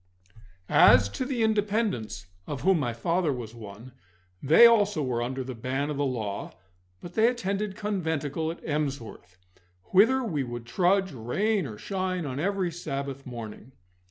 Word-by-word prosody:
As 100 0 +6
to 255 - -4
the 250 -4 -1
Independents, 205 - 0 0.2
of 145 - -4
whom 190 -2 +3
my 125 -5 -1
father 165 +8 0
was 120 -4 -6
one, 110 +2 -11 0.5
they 160 - +7
also 205 -8 +4
were 125 -3 -1
under 130 +2 -3
the 130 0 -6
ban 130 +5 -2
of 145 - -4
the 145 - +1
law, 110 -6 -4 0.5
but 175 - -9
they 220 +3 +4
attended 210 -4 -2
conventicle 160 -7 -2
at 165 - -8
Emsworth, 140 - -4 0.5
whither 255 +8 +5
we 155 - -1
would 120 -2 -6
trudge, 190 +8 +2
rain 175 - -1
or 110 -3 -8
shine, 185 - -3
on 135 -1 -4
every 190 +1 0
Sabbath 140 -5 -5
morning. 120 +1 -8
150 Hz, 155 wpm, -27 LUFS, 125-195 Hz, 0.5 s, they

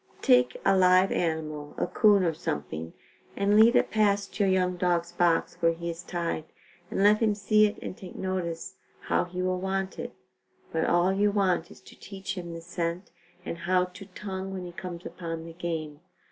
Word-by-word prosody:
Take 125 0 +4
a - - +5
live 185 0 +5
animal, 155 -3 -2
a - - +1
'coon 205 -3 +4
or 165 -2 +1
something, 80 - -4 0.4
and 200 +1 +2
lead 225 +3 +7
it - - +3
past 205 -2 +1
your 200 -2 +3
young 180 -1 +2
dog's 175 -1 0
box 175 -1 +1
where 165 -1 +3
he 170 +1 -4
is 165 +1 -8
tied 170 -3 -3 0.4
and 195 - 0
let 210 +1 +6
him 215 -3 +2
see 215 +1 +4
it 210 - -6
and - - -5
take 185 -2 -11
notice 185 0 -4 0.2
how - - +1
he 180 +1 -4
will 185 0 0
want 190 0 -2
it, - - -6 0.6
but 160 0 0
all 175 +2 +3
you 205 +1 +3
want 190 -5 +1
is - - -15
to - - -15
teach 195 -1 -6
him 175 -2 -6
the 165 0 -7
scent 170 +1 -4 0.3
and 170 - -5
how 180 -1 +4
to 185 +2 -12
tongue 195 -1 -6
when 185 -1 -5
he 175 - -7
comes 175 0 -7
up - - -10
on 165 -1 -4
the 165 - -9
game. 160 -3 -4
180 Hz, 200 wpm, -28 LUFS, 170-195 Hz, 0.6 s, lead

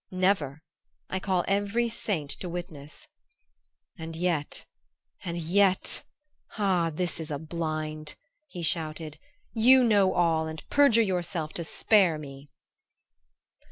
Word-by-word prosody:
Never. 185 -6 0 0.5
I 190 - -1
call 185 -2 0
every 205 +4 +1
saint 190 -10 -2
to 180 - -5
witness!" 160 -4 -7 0.9
"And 160 0 -6
yet 165 -3 -1 0.6
and 170 -1 -4
yet 185 +3 +2 0.5
ah, 185 -5 +2
this 175 +1 -2
is 160 0 -5
a 145 - -2
blind," 155 -1 -4 0.3
he 180 -11 -7
shouted; 155 -1 -2 0.3
"you 255 +3 +6
know 205 -5 +4
all 165 -2 +2
and 160 0 -8
perjure 265 -6 +5
yourself 175 -5 -2
to 170 - -3
spare 185 -1 +3
me!" 140 -1 -10
170 Hz, 120 wpm, -28 LUFS, 155-195 Hz, 0.9 s, you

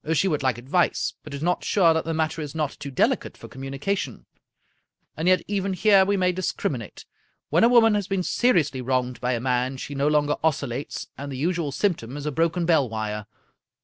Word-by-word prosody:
She 190 - +2
would 150 -5 0
like 130 -3 +1
advice, 140 +9 0
but 155 - -10
is 140 +1 -5
not 180 +1 0
sure 175 -5 +4
that 160 -1 -1
the 165 - -2
matter 160 0 -1
is 150 0 -6
not 150 -3 -1
too 145 -1 -6
deli 130 - +2
cate - - -11
for - - -11
communication. 135 - -4 0.9
And 160 +3 -2
yet 185 0 +4
even 195 -1 -1
here 195 0 +5
we 200 +1 +1
may 180 -1 +2
dis 185 0 -2
criminate. 115 -6 -5 0.5
When - - +4
a 230 - +6
woman 230 -3 +6
has 205 -2 -1
been 195 -2 -1
seriously 165 - +1
wronged 125 0 -1
by 125 +1 0
a 120 - -1
man, 125 +1 0
she 140 - -6
no 140 +1 0
longer 150 -1 +2
oscillates, 140 -4 -2
and 140 0 -6
the 130 - -5
usual 165 0 -1
S3miptom 140 - -1
is 145 - -6
a 150 - -1
broken 165 +3 0
bell 160 -7 +3
wire. 105 -1 -4
150 Hz, 210 wpm, -24 LUFS, 130-180 Hz, 0.9 s, a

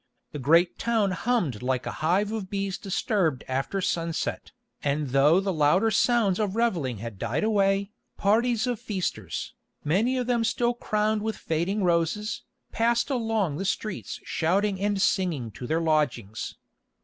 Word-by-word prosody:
The 150 - -6
great 165 +6 +3
town 225 -4 +1
hummed 180 - 0
like 130 +1 -1
a - - -3
hive 190 +6 +2
of 215 -4 -4
bees 195 -2 -2
disturbed 195 - 0
after 135 +9 -1
sunset, 170 -3 -2 0.3
and 145 0 -1
though 140 +6 +5
the 195 -1 -1
louder 175 +8 +3
sounds 215 -3 +3
of 205 -2 -1
revelling 170 - 0
had 110 -2 -7
died 120 - -1
away, 200 -2 +2 0.3
parties 230 +3 +2
of 245 -3 -2
feasters, 190 -4 -4 0.3
many 220 - +2
of 250 - 0
them 240 -1 +1
still 240 +2 +1
crowned 215 -2 0
with 220 +1 -2
fading 175 +6 -1
roses, 175 +6 0 0.3
passed 235 +3 +1
along 225 - 0
the 195 - -3
streets 195 +1 -3
shouting 190 +4 0
and 205 0 0
singing 170 - 0
to 125 - -8
their 160 +4 +1
lodgings. 125 -10 -1
195 Hz, 150 wpm, -26 LUFS, 155-220 Hz, 0.3 s, though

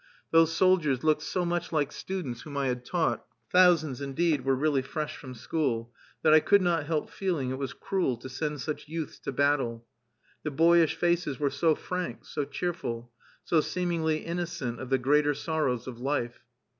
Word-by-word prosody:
Those 165 0 +5
soldiers 165 -7 +3
looked 155 -1 +3
so 180 +3 -1
much 175 0 -2
like 150 -4 +1
students 170 -11 -5
whom 145 -3 -7
I 140 - +1
had 125 -1 -3
taught 170 +5 0 0.3
(thousands, 165 -7 +4
indeed, 145 +1 0
were 135 0 +2
really 140 0 +1
fresh 150 +3 -4
from 130 -2 -9
school) 120 -3 -2 0.3
that 155 - +6
I 155 - +9
could 200 +4 +4
not 165 -4 +1
help 155 -2 -1
feeling 165 -10 -1
it 130 - -4
was 135 -1 -3
cruel 180 -11 -1
to 120 - -9
send 150 +2 -3
such 150 +1 -4
youths 160 0 -5
to - - -4
battle. 135 -4 +1 0.6
The 155 - -2
boyish 165 +2 +4
faces 170 -5 0
were 145 -2 +1
so 160 -2 +2
frank, 180 +2 -4
so 145 -2 -3
cheerful, 140 -6 -4 0.3
so 160 -3 +3
seemingly 165 -3 -1
innocent 170 -8 -3
of 130 - -6
the 135 - +3
greater 145 +3 +3
sorrows 145 -5 -1
of 125 -2 -7
life! 125 -2 -2
150 Hz, 180 wpm, -28 LUFS, 135-170 Hz, 0.6 s, I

